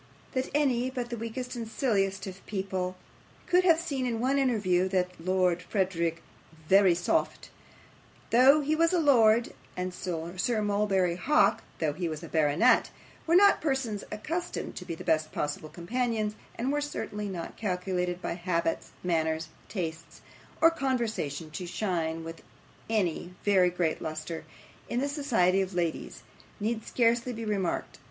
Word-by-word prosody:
That 260 0 -1
any 260 -4 +2
but 250 -2 -4
the - - -1
weakest 235 +3 -5
and 230 -2 -4
silliest 195 -6 0
of 190 0 -9
people 190 -2 -2 0.5
could 360 +1 +4
have 335 -3 +5
seen 280 -7 -2
in 230 -2 -1
one 265 +4 +2
interview 200 -9 +2
that 180 -1 +1
Lord 180 -1 +1 1.0
Verisopht, 185 -2 +3 0.8
though 265 +6 +7
he 300 +2 +1
was 330 +2 +3
a 355 - +3
lord, 235 -6 +4 0.2
and 180 0 -2
Sir 180 +5 -2
Mulberry 200 -4 +1
Hawk, 300 +10 +3 0.2
though 155 -3 0
he 175 +2 -2
was 155 +1 -6
a - - -6
baronet, 155 - +3 0.4
were 335 - +4
not 400 +2 +6
persons 265 -8 -1
accustomed 330 +12 -4
to - - -6
be 165 - -4
the - - -9
best 155 -1 +1
possible 150 +1 -3
companions, 220 +4 -1 0.2
and 250 +4 -1
were 295 0 0
certainly 210 -8 -4
not 175 -3 -6
calculated 180 -2 -2
by - - -1
habits, 170 -2 -2
manners, 160 -2 0 0.2
tastes, 165 -4 -5 0.4
or 330 +1 +7
conversation, 225 - -2
to 180 +3 -5
shine 165 -4 -2
with 165 0 -8 0.5
any 180 -4 -1
very 190 -3 +5
great 175 -2 -1
lustre 155 +1 -5 0.4
in 240 - 0
the 280 - 0
society 225 - +2
of 190 -1 -3
ladies, 170 -2 -2 0.4
need 220 +1 -2
scarcely 235 +1 +2
be 230 -1 -5
remarked. 200 -5 -2
200 Hz, 145 wpm, -29 LUFS, 175-245 Hz, 1.0 s, though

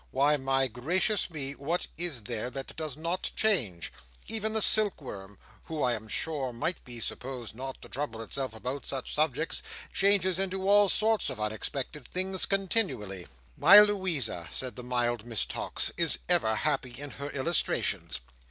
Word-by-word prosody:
"Why, 140 +3 +3
my 135 -1 +1
gracious 175 - +1
me, 145 -5 -2
what 145 +5 -2
is 160 -9 0
there 120 +1 -3
that 135 +1 -7
does 155 -3 -4
not 170 +3 -2
change! 120 - +1 0.3
even 220 -1 +1
the 220 - +2
silkworm, 125 - +1 0.3
who 160 -2 -3
I 125 - +2
am 110 -1 -5
sure 135 +4 -1
might 120 +9 -3
be 120 -2 -7
supposed 125 0 -6
not 130 +3 -7
to - - -9
trouble 120 -5 -4
itself 130 0 -4
about 125 +5 -4
such 135 -2 -3
subjects, 155 +1 0 0.3
changes 195 -2 +3
into 190 0 -2
all 205 0 +6
sorts 220 +2 +2
of - - -6
unexpected 120 +5 -4
things 185 +1 0
continually." 155 - 0 0.3
"My 195 +7 +9
Louisa," 180 - +2
said 130 -4 0
the - - -6
mild 120 -2 -1
Miss 115 -3 -1
Tox, - - -2
"is - - +3
ever 110 0 +3
happy 130 -2 -1
in 145 -1 -6
her 140 +1 -6
illustrations." 140 - 0
140 Hz, 160 wpm, -29 LUFS, 120-180 Hz, 0.3 s, My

